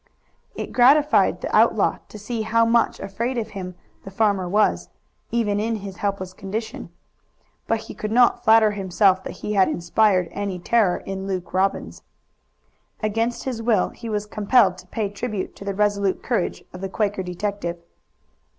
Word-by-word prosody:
It - - -6
gratified 285 +4 +4
the - - -2
outlaw - - +3
to - - -10
see 220 +2 -4
how 230 +1 +2
much 230 0 +2
afraid 230 +6 -3
of 225 -2 -2
him 185 -3 -7 0.3
the - - -8
farmer 195 -2 +1
was, 210 +3 +1 0.4
even 210 -3 0
in 225 +2 -1
his 200 -2 -7
helpless 195 -2 -3
condition. 210 +4 -6 0.8
But 225 -1 0
he - - -9
could 215 - -5
not 245 +1 +4
flatter 220 -1 +5
himself 190 -1 +2
that - - -4 0.2
he 210 - -1
had 195 -2 +4
inspired 185 +1 +2
any 200 -2 -3
terror 190 0 +2
in 195 0 -5
Luke 185 -2 -4
Robbins. 190 +1 -1 1.0
Against 225 +3 -1
his 250 -4 -4
will 225 -4 +2
he 230 - -9
was 210 -1 -2
compelled 210 -2 +2
to 185 - -15
pay 215 +2 -2
tribute 205 0 -5
to 200 - -10
the 200 -1 -3
resolute 200 -2 0
courage 230 -8 -1
of 180 - -9
the 195 - -3
Quaker 205 -1 -1
detective. 180 -1 -4
205 Hz, 165 wpm, -23 LUFS, 190-225 Hz, 1.0 s, flatter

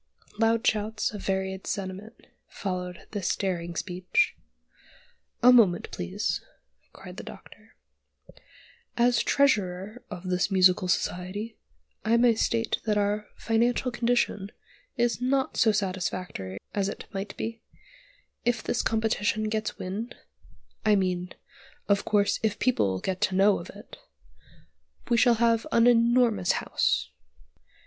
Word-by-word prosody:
Loud 230 +1 +2
shouts, 215 0 0
of 205 - -7
varied 190 0 -2
sentiment, 195 +3 -5 0.2
followed 180 -2 -5
this 205 -4 -1
daring 175 -3 -3
speech. 185 - 0 1.1
"A 250 +1 +8
moment, 200 -8 +4
please," 85 -1 -2 0.5
cried - - -12
the - - -6
Doctor; - - -13 1.2
"as 240 +1 +3
Treasurer 210 -4 +1
of 185 -3 -7
this 180 +2 +1
Musical 185 -1 +4
Society 185 +5 -2 0.5
I 230 +2 +3
may 240 0 +5
state 225 +1 0
that 210 -2 +1
our 205 +1 0
financial 240 +3 +1
condition 235 -4 0 0.5
is 240 0 +1
not 265 +1 0
so 220 - +4
satisfactory 185 - -3 0.2
as 200 -1 0
it - - -7
might 195 +1 -5
be: 225 0 -5 0.8
if 240 -2 0
this - - 0
competition 220 -1 0
gets 215 0 -2
wind 210 +6 -5 0.7
I 210 - +4
mean, 180 -2 -1 0.6
of 200 -1 +2
course, 205 -1 +2
if 215 -2 0
people 150 - +1
get 185 -1 -3
to 185 - +1
know 195 +1 +4
of - - -10
it, - - -12 1.1
we 235 - +3
shall 235 0 +5
have 230 0 +2
an 230 - +4
enormous 235 -5 +4
house." 70 - 0
210 Hz, 125 wpm, -27 LUFS, 185-230 Hz, 1.2 s, A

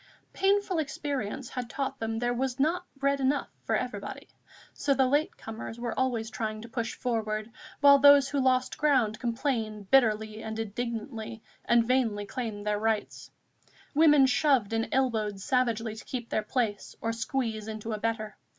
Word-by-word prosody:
Painful 390 -2 +2
experience 275 -5 -3
had 250 -2 -5
taught 270 0 -3
them 225 0 -2
there 240 +1 0
was 255 +1 -2
not 345 +5 +1
bread 275 0 +1
enough 270 +2 +1
for - - 0
everybody; - - -4 0.5
so 280 - +1
the 265 0 +4
late 290 +4 +1
comers 225 +1 -7
were 235 -1 -3
always 235 -4 -1
trying 215 -1 -3
to - - -8
push 230 0 -3
forward, 220 -2 -2 0.3
while 280 -1 +8
those 285 0 +7
who 285 - 0
lost 255 -1 +1
ground 255 -8 +2
complained 230 -5 -2
bitterly 220 -4 +3
and 220 0 -5
indignantly 225 0 -5 0.2
and 235 -1 +4
vainly 230 -5 +1
claimed 215 -3 -5
their 210 0 0
rights. 220 -1 -2 0.6
Women 295 -2 +6
shoved 255 -4 +2
and 225 0 0
elbowed 225 -7 0
savagely 235 -2 0
to 220 - -10
keep 240 -3 -5
their 215 - 0
place 215 -2 -2
or 230 0 -1
squeeze 230 -2 -2
into 220 0 -5
a 215 - -3
better. 220 -1 -2
235 Hz, 160 wpm, -28 LUFS, 220-270 Hz, 0.6 s, while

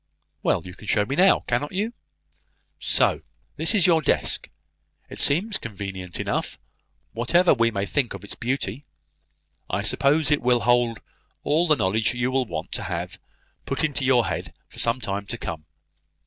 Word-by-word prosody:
"Well, - - +1
you 90 - -8
can 105 - -13
show 105 -1 +2
me 135 - -2
now, 185 +4 +5
cannot 125 +6 -2
you? 210 +5 -1 0.9
So, - - +2 0.4
this 165 +7 +3
is 190 -5 +4
your 165 -3 +5
desk! 145 - 0 0.6
It - - -8
seems 190 +9 +2
convenient 95 -4 -6
enough, - - -2 0.5
whatever 170 - +3
we 115 -3 +3
may 100 -3 -2
think 120 0 -1
of 100 - -10
its 100 - -9
beauty. 135 +2 -3 0.8
I - - -1
suppose 150 +2 +2
it 150 - +3
will 120 -1 +3
hold 120 -2 +2 0.4
all 160 +4 +2
the 155 - +5
knowledge 110 +1 +1
you 125 +1 0
will 130 -1 +1
want - - -5
to - - -4
have - - -4 0.5
put - - -1
into 145 -3 -1
your 125 -3 +4
head 85 -3 -4
for - - -11
some 115 +2 +2
time 100 -3 -4
to 120 - -3
come. 80 -7 -6
125 Hz, 170 wpm, -24 LUFS, 105-150 Hz, 0.9 s, now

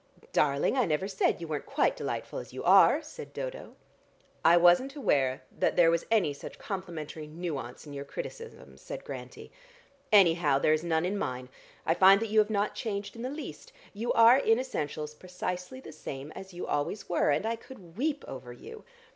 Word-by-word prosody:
"Darling, 140 - +2
I 250 - +3
never 160 +2 0
said 195 -1 +1
you 165 - -6
weren't 150 -2 -4
quite 310 - +1
delightful - - -4
as - - -10
you - - -6
are," - - +6
said 475 -1 -10
Dodo. - - -6 0.7
"I 170 +1 +7
wasn't 175 - +4
aware 135 - +1
that - - +1
there 170 -2 +5
was 170 0 -1
any 210 -10 +2
such 140 - -10
complimentary 165 -5 -6
nuance 150 -6 -6
in 145 - -9
your 140 0 -5
criticisms," 460 - -9
said - - -7
Grantie. - - -9 0.6
"Anyhow 170 -8 +5
there 155 +2 +3
is 155 +1 0
none 165 0 +1
in 200 +3 -1
mine. 125 -3 -4 0.4
I 165 - +3
find 190 +3 +7
that 225 0 -3
you 215 +1 +4
have 210 0 +3
not 205 -1 0
changed 200 -2 -4
in 230 - -8
the 250 - -3
least: 315 - -8 0.2
you 225 +4 -2
are 230 +3 +7
in 225 -4 +3
essentials 150 - -4
precisely 180 +7 -5
the 260 - -11
same 140 -1 -7
as 190 +3 -10
you 175 0 -6
always 145 +8 -2
were, 175 - +1
and 150 +7 +1
I 230 +1 0
could 200 -8 -14
weep 290 +4 -1
over 130 -2 -8
you. 120 - -11
180 Hz, 190 wpm, -29 LUFS, 150-230 Hz, 0.7 s, I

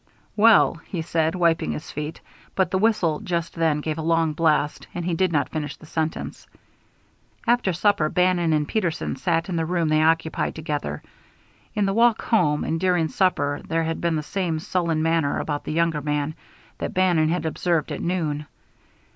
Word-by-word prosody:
"Well 210 -6 +5
" - - -26
he 170 -4 -2
said, 160 +1 0
wiping 170 -2 +1
his 155 - -7
feet; 150 +2 -5 0.3
but 185 -2 +1
the 190 - +1
whistle 200 -8 +2
just 170 -2 -3
then 160 -3 +1
gave 155 +1 -3
a - - -1
long 165 -1 +1
blast, 150 -2 +1
and 175 -1 -3
he 175 - 0
did 185 +1 +1
not 145 -5 +1
finish 150 -3 -4
the - - -15
sentence. 160 0 -4 1.0
After 240 -5 +2
supper 175 -3 +2
Bannon 180 -2 +2
and 150 -1 +1
Peterson 175 -6 -1
sat 165 -2 0
in 180 -3 -2
the 165 - +1
room 170 -2 0
they 155 0 +3
occupied 160 0 +1
together. 145 - -4 0.7
In 210 - +2
the 195 - 0
walk 230 +1 +3
home 150 -10 +2
and 165 - -1
during 175 -3 +1
supper 145 -7 +1
there 165 0 0
had 165 0 -3
been 170 -1 +1
the 155 - -2
same 175 -1 -2
sullen 165 -1 -1
manner 165 -3 +1
about 145 -1 -3
the - - -3
younger 165 -1 +1
man 150 +1 -1 0.5
that - - -4
Bannon 175 -4 +3
had 170 -1 -1
observed 165 0 0
at - - -4
noon. 155 -4 -2
165 Hz, 185 wpm, -23 LUFS, 155-180 Hz, 1.0 s, Well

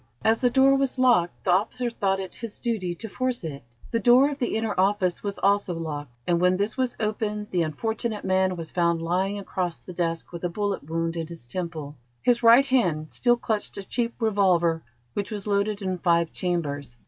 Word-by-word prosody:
As 225 +1 +3
the 250 - +4
door 270 +2 +5
was 270 -1 0
locked, 240 -10 +3
the 185 - +3
officer 235 +6 +1
thought 195 -4 0
it 190 -2 -6
his 230 -2 -6
duty 205 -8 -2
to 225 - -7
force 255 +1 -2
it. 145 -4 -5 0.3
The 230 - +1
door 250 +5 +5
of 285 - -6
the 245 - -1
inner 220 -1 0
office 190 -2 +1
was 200 -1 -4
also 200 -2 +2
locked, 150 -4 -5 0.2
and 170 -1 +1
when 180 0 +4
this 205 +3 -1
was 255 -2 -1
opened, 210 -1 -2
the 180 - +1
unfortunate 220 +7 -2
man 190 0 +2
was 165 -2 -7
found 170 -1 +1
lying 190 +4 0
across 185 -3 -3
the 180 - -11
desk 165 -1 -2
with 170 0 -8
a 175 - 0
bullet 200 -4 -3
wound 165 0 -1
in 165 -1 -3
his 165 -7 -10
temple. 155 0 -5 0.3
His 240 -1 +3
right 235 +3 +7
hand 180 - +1
still 240 -1 +3
clutched 220 -3 -2
a 200 - -5
cheap 235 -1 -1
revolver 185 -7 +2 0.3
which 200 - -3
was 210 -3 -5
loaded 205 0 0
in 185 -1 -2
five 170 -2 +2
chambers. 145 -8 -3
195 Hz, 205 wpm, -25 LUFS, 170-225 Hz, 0.3 s, right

